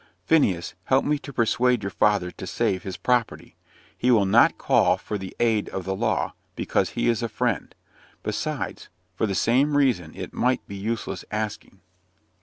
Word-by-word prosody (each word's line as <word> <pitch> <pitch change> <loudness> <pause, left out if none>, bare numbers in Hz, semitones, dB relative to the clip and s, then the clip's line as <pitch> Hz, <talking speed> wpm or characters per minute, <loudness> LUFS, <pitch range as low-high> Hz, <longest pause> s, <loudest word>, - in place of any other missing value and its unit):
Phineas, 95 - +2
help 130 +1 +3
me 150 0 +1
to 140 - -9
persuade 125 +1 +2
your 95 - -3
father 105 -4 +2
to - - -9
save 95 -1 0
his 95 -2 -6
property. 120 +4 -1 0.4
He 125 - 0
will 110 -5 +5
not 110 +5 +5
call - - +3
for 105 - -5
the 95 -1 -8
aid 110 -3 +2
of 95 - -5
the 95 0 -1
law, 110 +2 0 0.2
because - - -1
he - - +1
is 115 -2 +2
a 115 - -2
Friend. 120 -2 -2 0.5
Besides, - - -3 0.3
for 110 - 0
the 100 - -2
same 135 - +3
reason, 115 - +1
it - - -7
might 125 0 0
be 100 - -7
useless 110 +4 -3
asking." 105 -3 -5
110 Hz, 175 wpm, -25 LUFS, 95-125 Hz, 0.5 s, will